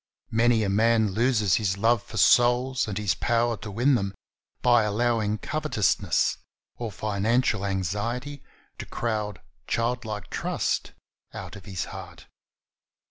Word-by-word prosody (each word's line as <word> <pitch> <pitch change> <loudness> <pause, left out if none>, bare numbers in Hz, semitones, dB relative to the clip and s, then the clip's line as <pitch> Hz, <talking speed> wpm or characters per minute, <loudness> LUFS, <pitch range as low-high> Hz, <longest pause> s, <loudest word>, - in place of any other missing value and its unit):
Many 115 0 +3
a 100 - 0
man 110 +1 +3
loses 110 -3 +2
his 100 -3 0
love 115 +2 +3
for 110 - -10
souls 125 +3 +4
and 100 -3 -4
his 105 -5 +1
power 120 0 +1
to 105 - -8
win 120 +8 +2
them 100 -5 -1 0.5
by 120 -2 +5
allowing 110 0 0
covet 155 +7 -4
ousness 105 -3 +2 0.4
or 115 -2 -5
financial 105 +3 0
anxiety 105 - -2 0.4
to - - -6
crowd 105 -5 -3 0.3
childlike 115 -4 -2
trust - - -2 0.4
out - - -7
of 100 - -12
his 95 -3 -4
heart. - - -10
110 Hz, 135 wpm, -26 LUFS, 105-120 Hz, 0.5 s, by